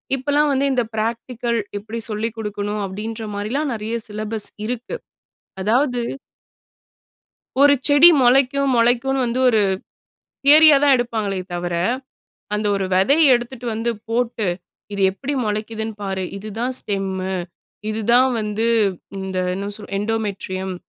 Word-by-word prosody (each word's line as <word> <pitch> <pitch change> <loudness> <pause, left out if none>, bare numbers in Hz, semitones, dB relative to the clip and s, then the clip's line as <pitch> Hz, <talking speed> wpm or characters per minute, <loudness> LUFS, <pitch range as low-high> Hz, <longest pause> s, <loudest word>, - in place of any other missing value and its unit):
இப்பலாம் 290 +3 +1
வந்து 275 0 +1
இந்த 250 -2 +2
பிராக்டிகல், 235 +1 -2 0.2
எப்படி 220 +3 -6
சொல்லிக் 220 +1 -3
கொடுக்கணும். 210 -1 -3
அப்படின்ற 215 +4 -5
மாரிலாம் 260 +9 -2
நெறய 220 +1 -4
சிலபஸ் 215 0 -4 0.2
இருக்கு. 245 - -4 0.7
அதாவது 245 +4 +1 1.6
ஒரு 285 0 +7
செடி 290 +4 +8
மொளைக்கும் 270 +2 +3
மொளைக்குன்னு 245 +3 +2
வந்து 240 +2 -1
ஒரு 220 -3 +3 0.8
தியரியா 305 +1 +8
தான் 285 -2 +6
எடுப்பாங்களே 220 -5 -2 0.2
தவிர, 175 0 -3 0.8
அந்த 210 0 -1
ஒரு 195 -1 -1
வெதைய 275 - +5
எடுத்துட்டு 240 +1 -4
வந்து 225 +2 -1 0.2
போட்டு 230 -2 -1 0.5
"இது 200 - -4
எப்புடி 275 +9 -4
மொளைக்குதுன்னு 220 +1 -3
பாரு. 190 -1 -2
இதுதான் 220 +5 -4
ஸ்டெம்மு 190 -1 -3 0.5
இதுதான் 235 +4 +3
வந்து 210 +1 -1 0.5
இந்த 190 -1 -4 0.2
என்ன 195 +2 -4
சொல் 210 -2 -11
எண்டோமெட்ரியம் 200 -3 -3
225 Hz, 120 wpm, -21 LUFS, 210-255 Hz, 1.6 s, செடி